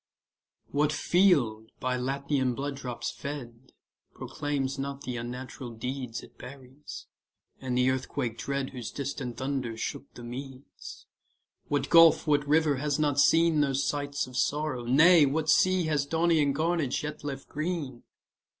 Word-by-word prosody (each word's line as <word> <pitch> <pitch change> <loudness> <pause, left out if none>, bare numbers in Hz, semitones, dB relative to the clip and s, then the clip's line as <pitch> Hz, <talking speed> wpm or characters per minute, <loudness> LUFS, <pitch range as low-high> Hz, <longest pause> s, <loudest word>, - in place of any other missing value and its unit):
What 150 +1 +2
field, 140 - +2
by 130 0 -1
Latian 130 0 -1
blood 140 +2 -3
drops 125 -3 -5
fed, 130 -3 -8 0.4
Proclaims 140 -2 -3
not 140 0 -4
the 125 -2 -5
unnatural 125 +1 -6
deeds 125 0 -5
It - - -17
buries, 130 +2 -10 0.5
and 125 -2 -2
the 125 0 +3
earthquake 130 -2 -3
dread 140 -1 -3
Whose 125 -4 -6
distant 135 -3 -5
thunder 130 -4 -3
shook 140 +4 -5
the 120 - -10
Medes? 130 +2 -9 0.6
What 145 - -1
gulf, 165 -1 +7
what 145 -1 +2
river 150 -1 +3
has 145 +1 -1
not 145 -2 +1
seen 165 0 +4
Those 140 -2 +1
sights 145 -1 -2
of 125 0 -12
sorrow? 145 -3 -1
nay, 155 +5 +6
what 155 +3 -1
sea 185 +2 +4
Has 150 -3 0
Daunian 160 -2 +2
carnage 160 -4 0
yet 150 0 -6
left 135 -2 -6
green? 150 -6 -4
140 Hz, 140 wpm, -28 LUFS, 130-150 Hz, 0.6 s, gulf